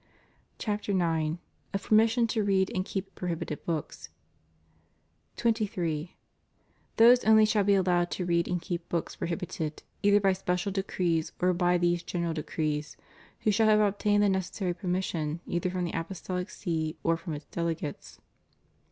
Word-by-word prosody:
CHAPTER 210 -1 -2
IX. 165 -3 +1 0.4
Of 195 - -2
Permission 225 +2 +4
to 220 -2 0
Read 195 -1 +2
and 185 - 0
Keep 195 0 -5
Prohibited 170 -4 -4
Books. 160 -3 -4 1.3
23. 185 -8 -1 0.8
Those 240 +2 +7
only 220 0 +6
shall 215 -1 +2
be 200 0 +4
allowed 175 -2 +2
to 180 - -3
read 170 -1 +1
and 180 - -1
keep 170 0 -5
books 170 -2 -2
prohibited, 165 -3 -4 0.2
either 205 0 +5
by 195 -1 +3
special 180 0 -1
decrees 180 -4 -1
or 180 0 +3
by 175 0 +2
these 175 0 +1
General 170 -1 -2
Decrees, 155 -1 -3 0.4
who 220 -2 +3
shall 220 +2 +3
have 215 -1 +5
obtained 205 0 +2
the 205 - +4
necessary 190 -1 -1
permission, 175 -3 -2
either 175 +1 -1
from 180 0 -2
the 170 - -4
Apostolic 180 +1 -4
See 160 -3 -3
or 165 - +3
from 165 0 -6
its 145 0 -7
delegates. 165 -3 -4
180 Hz, 150 wpm, -29 LUFS, 170-200 Hz, 1.3 s, Those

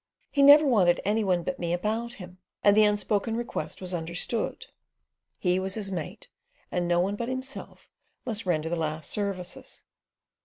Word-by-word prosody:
"He 280 - +2
never 290 +2 +9
wanted 190 -10 +4
any 215 +2 +2
one 180 -3 +1
but 185 - -4
me 170 -1 -1
about 220 +6 -2
him," 180 -3 -11 0.2
and 205 0 +6
the 215 0 +6
unspoken 210 +2 0
request 240 -4 -4
was 185 0 -4
understood. 170 +7 -3 0.7
He 180 0 +1
was 190 0 -2
his 205 -3 -2
mate, 180 +4 -5 0.4
and 175 -1 -1
no 175 0 +2
one 195 +3 +1
but 235 +3 -4
himself 260 +1 -5 0.4
must 220 -3 -3
render 160 -3 +1
the 170 - -1
last 155 -2 -3
services. 195 -4 -4
195 Hz, 165 wpm, -27 LUFS, 175-225 Hz, 0.7 s, never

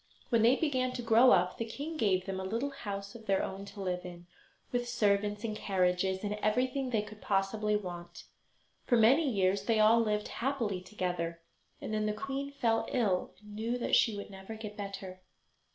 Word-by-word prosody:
When 230 -3 +3
they 235 +4 +6
began 260 -4 0
to 245 - -4
grow 230 +2 +6
up 180 -3 +3
the - - 0
king 290 +8 -6
gave 190 -9 +1
them 190 -1 -3
a 225 +9 -2
house 200 -6 -6
of 225 -2 -12
their 195 -1 +2
own 195 +1 -5
to 200 0 -9
live 180 -1 -2
in, 175 -1 -9 0.5
with 245 -1 -1
servants 205 -2 +1
and 220 -2 -2
carriages, 190 -1 0
and 205 0 -1
everything 255 +4 +1
they 220 -4 +1
could 215 0 -12
possibly 210 +2 +1
want. 175 -4 -6 0.6
For 240 - +4
many 270 +7 +5
years 195 -2 +1
they 225 -1 +2
all 220 +2 +6
lived 210 -2 0
happily 235 -8 -2
together, 180 -3 -3 0.4
and - - -5
then 215 0 0
the 210 - 0
queen 275 +5 -4
fell 225 -5 0
ill, 205 -8 0
and 210 0 -13
knew 225 +3 -2
that 245 - +2
she 220 -3 +3
would 200 - -7
never 195 +3 -8
get 215 -1 -7
better. 195 -2 -7
210 Hz, 190 wpm, -31 LUFS, 195-235 Hz, 0.6 s, they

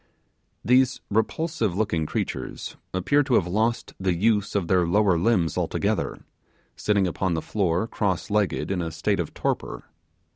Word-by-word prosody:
These 130 +1 +4
repulsive 110 - 0
looking 85 -7 0
creatures - - -4 0.2
appeared 140 +11 +2
to 125 - +3
have 85 - +3
lost 110 +6 -1
the 95 -2 +1
use 105 +2 +1
of 95 -4 0
their 90 -2 +3
lower 100 0 +3
limbs 85 -3 +1
altogether; - - -1 0.5
sitting 100 -2 +1
upon 90 0 -1
the - - 0
floor 90 -2 0
cross 100 -3 -2
legged 105 -2 0
in 95 -2 0
a 85 - -2
state 80 0 -1
of - - -3
torpor. - - -2
100 Hz, 150 wpm, -25 LUFS, 90-110 Hz, 0.5 s, These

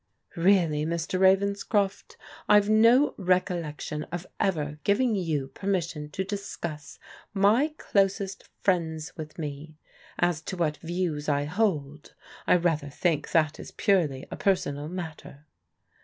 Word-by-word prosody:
" - - -30
Really, 170 -4 +3
Mr. 170 +3 -2
Ravenscroft, 200 +1 +1 0.3
I've 205 -1 +6
no 230 +6 +5
recollection 170 -5 -1
of 175 +1 -6
ever 150 -7 -1
giving 225 +4 +2
you 160 -9 -1
permission 170 -5 -2
to 190 - -3
discuss 180 -6 -6 0.4
my 230 +11 +3
closest 195 0 0
friends 165 -3 -1
with 155 -2 -8
me. 150 0 -6 0.4
As 175 -3 +1
to 185 +2 -6
what 155 -3 0
views 165 -3 -2
I 145 0 +2
hold 150 -5 -2 0.2
— - - -19
I - - +6
rather 165 -5 +1
think 155 +1 0
that 155 -2 +2
is - - -8
purely 160 -10 +1
a - - -3
personal 150 -6 0
matter." 160 -4 -8
175 Hz, 130 wpm, -27 LUFS, 150-195 Hz, 0.4 s, I've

